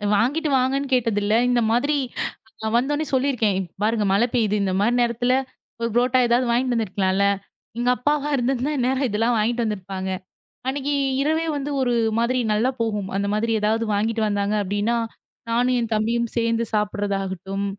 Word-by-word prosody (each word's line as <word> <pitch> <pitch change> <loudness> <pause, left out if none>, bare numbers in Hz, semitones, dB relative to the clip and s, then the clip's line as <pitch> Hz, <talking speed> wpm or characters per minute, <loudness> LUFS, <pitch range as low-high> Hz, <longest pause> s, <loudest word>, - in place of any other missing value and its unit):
வாங்கிட்டு 290 +9 +1
வாங்கன்னு 270 +2 0
கேட்டதில்லை. 220 -3 +2
இந்த 245 -1 +3
மாதிரி 285 +6 +2 0.6
நான் 220 +1 -1
வந்தவுடனே 290 +5 0
சொல்லி 265 +2 +2
இருக்கேன், 220 -6 +1
இப்ப 180 -3 -6
பாருங்க! 215 -1 +1
மழை 220 +5 +3
பெய்து. 220 -4 +2
இந்தமாரி 195 +4 +1
நேரத்துல 240 +1 +1 0.5
ஒரு 230 - 0
புரோட்டா 250 +1 +3
ஏதாவது 240 +2 +2
வாங்கிட்டு 245 +1 +1
வந்திருக்கலாம்ல. 200 -3 +1 0.5
எங்க 240 +1 +1
அப்பாவா 295 +2 0
இருந்ததா, 260 +2 0
இந்நேரம் 260 +1 +1
இதுலாம் 225 +3 +1
வாங்கிட்டு 235 +3 +1
வந்து 210 -1 -1
இருப்பாங்க. 190 0 -5 0.6
அன்னக்கி 280 +2 -1 0.3
இரவே 315 +3 +1
வந்து 285 +1 -3
ஒரு 245 -2 +1 0.3
மாதிரி 245 +2 +1
நல்லா 220 +5 +2
போகும். 210 -4 -1
அந்தமாதிரி 210 +3 0
எதாவது 220 +2 +1
வாங்கிட்டு 220 +2 0
வந்தாங்க 205 0 0
அப்பிடின்னா, 205 +4 0 0.5
நானும் 245 +2 +2
என் 230 -1 -4
தம்பியும் 230 +2 0
சேர்ந்து 230 0 +1
சாப்பிடறதாகட்டும், 195 -2 -2
230 Hz, 150 wpm, -23 LUFS, 210-255 Hz, 0.6 s, இந்த